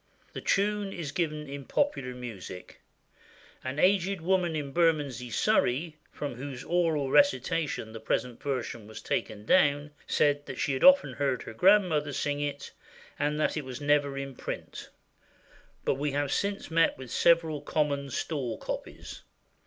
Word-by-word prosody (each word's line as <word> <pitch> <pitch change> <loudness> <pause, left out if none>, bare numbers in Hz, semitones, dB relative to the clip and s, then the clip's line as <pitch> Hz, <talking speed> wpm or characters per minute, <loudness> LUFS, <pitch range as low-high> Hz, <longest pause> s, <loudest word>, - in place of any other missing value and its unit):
The - - -6
tune 205 0 +1
is 165 -7 -5
given 155 -2 -2
in 140 0 -6
Popular 135 - -1
Music. 110 -7 -9 0.8
An 130 +2 -4
aged 190 +2 +3
woman 175 -1 +1
in 145 -2 -3
Bermondsey, 145 -7 +1
Surrey, 160 - +1 0.2
from 145 -3 -5
whose 130 -1 -6
oral 165 -6 +1
recitation 165 - +2
the 115 - -7
present 125 +1 -2
version 120 -5 -3
was 110 0 -9
taken 105 -1 -3
down, 145 -1 +3 0.2
said 145 -1 +2
that 135 - -6
she 145 -4 0
had 130 - -2
often 275 0 +7
heard 135 -4 -1
her - - -8
grandmother 165 - +4
sing 145 +1 -1
it, 145 -1 -4 0.5
and 150 +1 0
that 155 - +1
it 155 - -2
was 130 -1 -7
never 145 -1 +2
in 135 -1 -5
print; - - -7 1.0
but - - +3
we 145 -1 -1
have 145 -1 0
since 200 -3 -2
met 165 0 +3
with 130 -2 -9
several 165 -3 +3
common 145 -2 -1
stall 130 -5 -3
copies. - - -7
145 Hz, 155 wpm, -29 LUFS, 135-165 Hz, 1.0 s, often